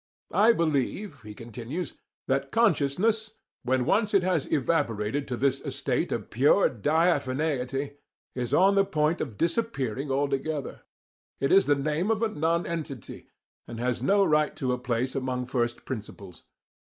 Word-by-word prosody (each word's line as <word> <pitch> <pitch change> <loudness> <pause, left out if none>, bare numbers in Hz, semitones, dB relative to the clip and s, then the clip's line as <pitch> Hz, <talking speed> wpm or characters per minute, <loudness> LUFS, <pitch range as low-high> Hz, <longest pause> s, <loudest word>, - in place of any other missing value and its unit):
I 220 +3 +6
believe 155 - -1
(he 105 0 -10
continues) 120 - -6 0.3
that 135 +1 0
'consciousness,' 215 +3 +2 0.3
when 130 0 +1
once 210 - +2
it 195 - +4
has 180 -6 0
evaporated 140 -4 0
to 125 - -3
this 135 +1 +1
estate 140 +2 -2
of 110 -4 -4
pure 140 - +4
diaphaneity, 140 - 0 0.4
is 125 -1 -3
on 195 +2 +5
the 195 0 +4
point 155 -2 0
of 115 -8 -5
disappearing 150 - -1
altogether. 140 +1 -2 0.6
It 135 - 0
is 195 - +5
the 145 - +4
name 150 +7 -1
of 225 0 +1
a 225 - +2
nonentity, 165 - -3 0.4
and 115 - -7
has 125 0 -1
no 200 +8 +4
right 150 -2 +2
to 130 -3 -1
a 125 - -3
place 125 +1 -1
among 130 -2 -2
first 120 -2 -2
principles. 100 -6 -8
140 Hz, 145 wpm, -27 LUFS, 125-170 Hz, 0.6 s, I